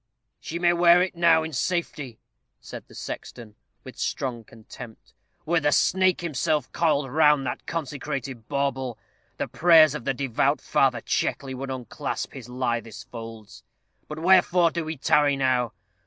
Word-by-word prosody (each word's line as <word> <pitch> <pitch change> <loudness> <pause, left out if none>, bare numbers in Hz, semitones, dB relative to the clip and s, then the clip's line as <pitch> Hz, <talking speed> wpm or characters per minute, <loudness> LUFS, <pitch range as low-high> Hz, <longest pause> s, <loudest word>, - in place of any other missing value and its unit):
"She 165 - -5
may 175 0 +3
wear 175 0 +6
it 185 - -4
now 165 -2 +4
in 160 0 -6
safety," 145 -6 -3 0.4
said - - -10
the - - -16
sexton, 115 -4 -8 0.3
with - - -12
strong 120 -4 -3
contempt. 115 +1 -13 0.3
"Were 170 +1 +2
the 145 -1 +1
snake 185 +4 +2
himself 150 -3 -1
coiled 150 -4 +1
round 150 -2 +4
that 125 - -5
consecrated 135 -6 -5
bauble, 135 -4 -2 0.4
the - - -2
prayers 160 -3 +5
of 150 -6 -6
the 135 - 0
devout 135 -3 0
Father - - +1
Checkley 135 -1 -2
would 135 +1 -6
unclasp 130 -4 -5
his 125 -3 -10
lithest 120 -4 -4
folds. 115 -2 -10 0.5
But 150 - -7
wherefore 180 0 +4
do 170 -1 -3
we 160 0 -5
tarry 145 +1 +3
now? 130 -3 +1
140 Hz, 150 wpm, -25 LUFS, 125-165 Hz, 0.5 s, wear